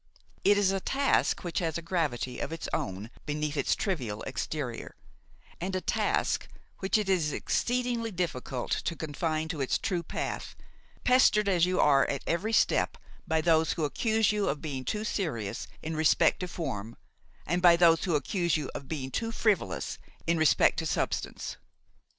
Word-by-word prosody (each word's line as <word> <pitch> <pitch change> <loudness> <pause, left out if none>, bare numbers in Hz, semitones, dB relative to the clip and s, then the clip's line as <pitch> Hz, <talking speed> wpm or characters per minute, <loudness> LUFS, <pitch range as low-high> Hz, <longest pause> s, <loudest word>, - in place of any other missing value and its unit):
It 205 0 +5
is 200 -2 +3
a 195 - 0
task 275 +8 +1
which 175 -2 -2
has 165 -2 -1
a - - -5
gravity 150 -8 -1
of - - -3
its 165 - -5
own 100 +4 -3 0.2
beneath 150 0 -2
its 145 - +1
trivial 125 - -2
exterior, 135 -2 -4 0.6
and 185 +2 -3
a - - +1
task - - 0 0.3
which 190 +3 +2
it 210 -2 -1
is 175 -6 +2
exceedingly 245 - 0
difficult 145 - -3
to 170 - -1
confine 155 +1 -2
to 160 -4 -3
its 135 - +1
true 180 -5 -1
path, 170 - -4 0.5
pestered 250 -5 +5
as 180 -3 +3
you 185 0 0
are 140 -2 +5
at 140 - -2
every 185 +7 0
step - - +2 0.3
by 160 0 +2
those 160 -1 +3
who 160 - -1
accuse 220 +7 +2
you 210 -1 0
of 150 - -1
being 135 -5 -5
too 210 0 -2
serious 120 - -3 0.2
in 160 +1 -3
respect 155 0 +3
to 180 - -3
form 115 - -5 0.5
and 175 +3 0
by 175 -1 +8
those 170 -1 +5
who 175 -4 +1
accuse 170 +4 +1
you 150 -3 -4
of 140 - -7
being 135 -3 -4
too 225 - -2
frivolous 160 - 0 0.3
in 170 0 +1
respect 160 -2 +4
to - - -2
substance. - - -2
165 Hz, 170 wpm, -29 LUFS, 145-190 Hz, 0.6 s, by